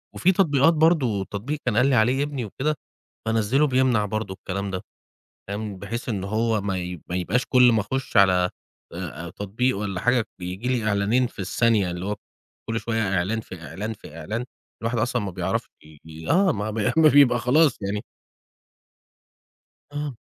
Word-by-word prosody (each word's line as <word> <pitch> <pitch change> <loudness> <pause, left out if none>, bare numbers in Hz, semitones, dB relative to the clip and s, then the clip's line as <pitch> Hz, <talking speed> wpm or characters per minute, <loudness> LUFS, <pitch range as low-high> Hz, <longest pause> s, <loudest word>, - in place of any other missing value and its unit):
وفي 185 - +3
تطبيقات 165 -4 +4
برضه، 150 - +3
تطبيق 125 +11 -4
كان 120 -4 +1
قال 125 - +5
لي 135 - +3
عليه 125 +5 +3
ابني 140 -5 -3
وكده، 135 +9 -2 0.5
بانزّله 115 +6 +2
بيمنع 130 -5 +2
برضه 110 -1 -3
الكلام 100 +1 -4
ده، 95 -1 -3 0.7
فاهم، 100 -1 -4
بحيث 115 +6 -5
إن 100 -5 -2
هو 110 +2 0
ما 95 -2 -2
ي 90 -2 -5
ما 90 - -2
يبقاش 95 +8 0
كل 125 -1 +6
ما 110 - +3
أخُش 130 +5 -3
على 90 -2 +5 0.4
آآ 85 -1 -6
تطبيق 110 +7 -1
والّا 100 -3 -3
حاجة 120 -1 +2
بييجي 90 +6 -4
لي 120 -4 0
إعلانين 105 +5 +2
في 125 - -14
الثانية 100 0 +2
اللي 90 +1 -5
هو 105 +1 -2 0.5
كل 115 0 -1
شوية 115 -1 -1
إعلان، 100 +6 0
في 95 -6 -11
إعلان، 105 +10 -4
في 80 -7 -12
إعلان، 110 +9 -3 0.4
الواحد 115 +1 -1
أصلًا 120 0 0
ما 100 - -3
بيعرفش 90 -1 -2 0.2
ي 75 -1 -16
ي 80 0 -8
آه، 190 +2 +4
ما 105 +1 -3
بي 110 -1 0
ما 160 -1 +7
بيبقى 140 -4 +6
خلاص 145 +5 +3
يعني. 100 +1 -2 1.9
آه. 145 -4 -4
110 Hz, 175 wpm, -24 LUFS, 95-125 Hz, 1.9 s, ما